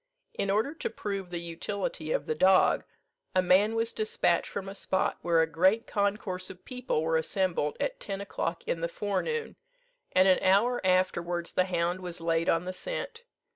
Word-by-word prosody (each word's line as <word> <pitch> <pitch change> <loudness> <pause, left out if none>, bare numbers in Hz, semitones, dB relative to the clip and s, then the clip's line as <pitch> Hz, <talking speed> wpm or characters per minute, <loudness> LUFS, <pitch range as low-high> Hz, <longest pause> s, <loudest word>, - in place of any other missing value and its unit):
In 200 - -2
order 220 +9 +1
to 325 - -4
prove 195 -3 -4
the 175 - -4
utility 170 -1 -4
of - - 0
the - - 0
dog, 185 +4 +4 0.5
a 185 - +4
man 200 +5 +4
was 225 0 0
dispatched 445 +2 +1
from 195 -1 -5
a 195 - -6
spot 190 -1 -1
where 165 -1 +3
a - - +2
great 185 +8 +2
concourse 200 -3 -1
of 185 -1 -12
people 250 - -2
were 160 0 +2
assembled, 165 -2 0
at - - -2
ten 195 -2 -4
o'clock 180 -4 -3
in 165 - -1
the 170 - 0
forenoon, 210 - -2 0.5
and 185 +1 +5
an 185 - +5
hour 215 +6 +3
afterwards 175 -2 +1
the 185 - +3
hound 175 0 -1
was 180 -2 -5
laid 165 0 +1
on 165 +2 +2
the 185 - -4
scent. 475 - -5
185 Hz, 180 wpm, -29 LUFS, 170-205 Hz, 0.5 s, and